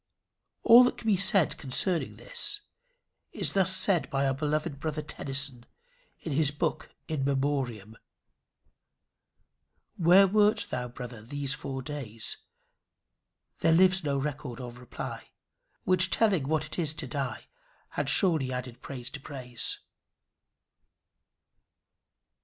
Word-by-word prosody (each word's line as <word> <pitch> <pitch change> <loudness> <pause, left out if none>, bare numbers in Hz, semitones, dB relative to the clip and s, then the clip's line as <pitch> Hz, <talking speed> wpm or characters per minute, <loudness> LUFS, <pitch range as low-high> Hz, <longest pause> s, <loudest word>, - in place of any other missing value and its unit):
All 240 +2 +9
that - - -1
can - - -12
be 215 -3 +3
said 190 -2 +2
concerning 160 +6 +1
this, 475 -4 -2 0.7
is - - -1
thus 190 -1 +4
said 185 -5 +3
by 140 0 0
our 135 - +1
beloved 150 +1 -2
brother 155 0 -3
Tennyson 140 -4 -1 0.6
in 165 - -5
his 145 +1 +2
book 150 - -3 0.2
In 155 -4 -2
Memoriam: 135 -6 -2 2.0
'Where 180 +3 +6
wert 210 +2 +3
thou, 125 - -3
brother, 120 -2 -9
those 140 +4 -4
four 135 -3 -6
days?' 125 -6 -5 1.2
There 165 0 +3
lives 185 +2 +4
no 140 -2 0
record 135 -3 -4
of 120 -1 -8
reply, 125 - -8 0.5
Which 185 0 +3
telling 190 -12 +2
what 155 0 0
it 155 - -6
is 155 -2 -1
to 155 -2 -4
die, 130 -3 -4 0.4
Had - - -3
surely 160 -9 +3
added 125 -1 -6
praise 130 -3 -7
to 140 - -7
praise. 125 -4 -4
145 Hz, 125 wpm, -28 LUFS, 130-175 Hz, 2.0 s, All